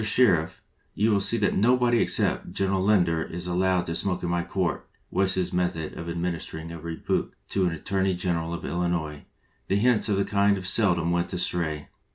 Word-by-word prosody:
Sher 105 Hz, -5 st, +4 dB
iff, 90 Hz, +3 st, -11 dB, 0.3 s
you 110 Hz, +3 st, +2 dB
will 100 Hz, -1 st, +2 dB
see 110 Hz, +4 st, +1 dB
that 105 Hz, -2 st, +1 dB
nobody 120 Hz, +2 st, +3 dB
except -, -, 0 dB
General 95 Hz, -1 st, 0 dB
Lin 100 Hz, -1 st, +4 dB
der 85 Hz, -2 st, -1 dB
is 85 Hz, +2 st, -5 dB
allowed 90 Hz, 0 st, +1 dB
to 85 Hz, -, -3 dB
smoke 90 Hz, +2 st, -1 dB
in 85 Hz, -, -1 dB
my 85 Hz, 0 st, 0 dB
court," 85 Hz, -3 st, -2 dB, 0.2 s
was 95 Hz, -1 st, +1 dB
his 95 Hz, -1 st, -1 dB
method 90 Hz, -3 st, -1 dB
of 85 Hz, 0 st, -6 dB
administering 85 Hz, -1 st, -4 dB
a 85 Hz, -, -7 dB
rebuke 80 Hz, +1 st, -3 dB
to 95 Hz, -2 st, +1 dB
the 80 Hz, -, -4 dB
Attor 95 Hz, +4 st, -2 dB
ney 95 Hz, -1 st, +1 dB
General 85 Hz, -2 st, -2 dB
of -, -, -7 dB
Illinois, 85 Hz, -4 st, -2 dB, 0.4 s
and 100 Hz, -, +2 dB
hints 120 Hz, -1 st, +3 dB
of 100 Hz, -, +2 dB
this 100 Hz, -, 0 dB
kind 100 Hz, -2 st, +2 dB
seldom 90 Hz, -4 st, +2 dB
went 85 Hz, 0 st, 0 dB
astray. 80 Hz, -4 st, -2 dB
90 Hz, 200 wpm, -26 LUFS, 85-100 Hz, 0.4 s, Sher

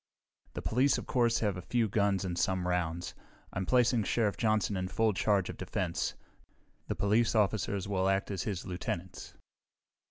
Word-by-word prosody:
"The -, -, -5 dB
police, 130 Hz, +4 st, +3 dB
of -, -, -5 dB
course, 120 Hz, -2 st, +2 dB
have 100 Hz, -4 st, 0 dB
a -, -, -5 dB
few 115 Hz, +5 st, 0 dB
guns 100 Hz, -2 st, +1 dB
and 90 Hz, -2 st, -2 dB
some 90 Hz, +1 st, 0 dB
rounds. 85 Hz, -1 st, -1 dB, 0.4 s
I'm 95 Hz, -2 st, -3 dB
placing 125 Hz, -2 st, +3 dB
Sheriff 105 Hz, -3 st, +1 dB
Johnson 110 Hz, -2 st, +1 dB
in 95 Hz, 0 st, -2 dB
full 110 Hz, +4 st, +1 dB
charge 100 Hz, -1 st, +1 dB
of -, -, -6 dB
defense. -, -, -2 dB, 0.7 s
The -, -, -2 dB
police 110 Hz, +3 st, +2 dB
officers 100 Hz, -2 st, +1 dB
will 95 Hz, -1 st, +1 dB
act 95 Hz, +1 st, 0 dB
as 95 Hz, -4 st, -2 dB
his 95 Hz, +1 st, -3 dB
lieutenants." 90 Hz, 0 st, -5 dB
100 Hz, 165 wpm, -31 LUFS, 95-110 Hz, 0.7 s, police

